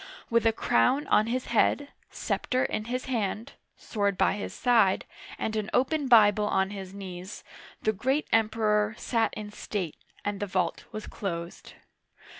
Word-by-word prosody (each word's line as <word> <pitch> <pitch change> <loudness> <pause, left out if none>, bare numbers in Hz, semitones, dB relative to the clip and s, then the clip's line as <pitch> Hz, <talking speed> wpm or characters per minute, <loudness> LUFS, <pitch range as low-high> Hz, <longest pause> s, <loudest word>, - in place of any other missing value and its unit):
With 230 0 +3
a - - +5
crown 225 - +2
on 215 - +4
his 250 +2 -1
head, 285 +5 +2 0.2
scepter 255 0 -1
in 215 - -2
his 250 +2 -3
hand, 230 0 -2 0.2
sword 200 -3 -1
by - - +3
his 205 - -5
side, 230 -6 +3 0.3
and 220 - -2
an 215 -1 -2
open 280 +2 +1
Bible 210 -3 +6
on 190 -1 +1
his 190 -2 -7
knees, 190 -1 -8 0.4
the 215 - +2
great 265 +9 0
Emperor 215 -1 +2
sat 230 -2 0
in 210 -1 -6
state, 195 -5 -4 0.3
and 205 -1 -2
the 205 - -2
vault 185 -3 -1
was 215 - -6
closed. 170 -3 -6
215 Hz, 155 wpm, -28 LUFS, 200-235 Hz, 0.4 s, Bible